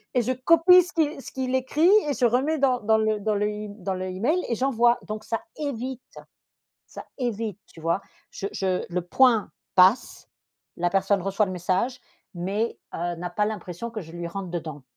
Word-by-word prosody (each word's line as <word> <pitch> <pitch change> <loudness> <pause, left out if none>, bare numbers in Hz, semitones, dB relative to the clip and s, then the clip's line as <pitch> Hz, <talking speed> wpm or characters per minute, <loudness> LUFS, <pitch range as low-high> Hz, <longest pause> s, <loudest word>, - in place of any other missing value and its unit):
et 250 - +4
je 255 - 0
copie 335 +7 +6
ce 360 - -10
qui 305 -3 0
ce - - -10
qu'il 260 -1 -3
écrit 295 +7 +2 0.2
et - - +1
je 250 - +2
remets 265 +7 +2
dans 255 -3 +2
dans 220 +1 +3
le 215 -1 +1
dans 215 +1 0
l'e 210 +1 -2 0.2
dans 190 -1 -1
l'e-mail 185 - -1
et 235 - +1
j'envoie. 240 -1 +3
Donc 215 0 -5
ça 230 - -2 0.2
évite 260 -3 -4 0.9
ça - - -10
évite, 225 -4 -3
tu 165 - -15
vois? 165 +4 0 0.3
Je 195 - -5
je 185 -2 -1
le 180 0 -1
point 230 +4 +3 0.2
passe. 190 +6 +3 0.5
La 175 0 0
personne 195 +1 +2
reçoit 195 +2 +1
le - - -5
message 185 +8 -1 0.3
mais 200 +6 -2 0.2
heu, 175 0 -2
n'a 175 +1 -5
pas 210 -1 0
l'impression 210 +1 -5
que 220 - -5
je 160 0 -12
lui 170 0 -5
rentre 190 +1 -5
dedans 155 -5 -5
215 Hz, 190 wpm, -25 LUFS, 185-255 Hz, 0.9 s, copie